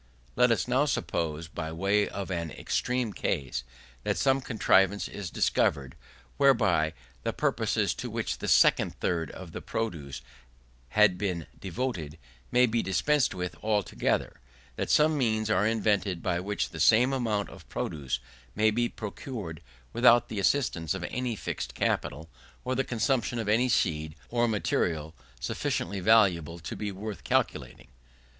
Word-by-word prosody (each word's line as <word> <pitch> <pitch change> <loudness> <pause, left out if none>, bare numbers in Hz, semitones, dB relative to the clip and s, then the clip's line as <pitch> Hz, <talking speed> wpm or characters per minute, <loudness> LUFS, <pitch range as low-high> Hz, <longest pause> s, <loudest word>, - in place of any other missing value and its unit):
Let - - +5
us - - +1
now - - +3
suppose, 80 0 -2
by 80 -1 -5
way 100 +5 +1
of 100 -1 -5
an 85 -2 -2
extreme 125 - -1
case, 65 -3 -2 0.4
that - - 0
some 135 0 +2
contrivance 100 -4 +2
is 100 -4 -6
discovered, 70 -5 +1 0.4
whereby 80 +5 +3 0.3
the - - -2
purposes - - 0
to - - -4
which - - -3
the - - -4
second - - +4
third 80 -2 -1
of 90 -3 -9
the - - -6
produce 75 - -4 0.7
had 95 - +4
been 90 -6 -2
devoted, 95 - -4 0.3
may 125 +1 +5
be 115 -1 0
dispensed 135 +5 +1
with 90 -1 -4
altogether: 105 -3 0 0.4
that - - -3
some 155 0 +4
means 110 -3 +1
are 105 -1 +3
invented 100 -5 0
by 85 -2 0
which 100 +3 -2
the - - -8
same 125 +4 +5
amount 110 -6 -1
of - - -14
produce 70 -5 -3 0.4
may 110 +1 +3
be 120 +2 0
procured 105 - -6 0.3
without 120 0 +5
the 105 - -3
assistance 95 - +1
of 95 - -5
any 125 -2 -2
fixed 65 - -5
capital, 75 +5 -1 0.4
or 130 - 0
the 135 +1 +1
consumption 120 -1 0
of 115 -2 -3
any 115 +5 +3
seed 80 -9 0
or 120 0 +2
material 80 -7 -1 0.3
sufficiently 100 +9 -2
valuable 90 -6 +3
to 85 - -6
be 105 -1 -3
worth 100 +2 -6
calculating. - - -1
100 Hz, 150 wpm, -28 LUFS, 85-115 Hz, 0.7 s, Let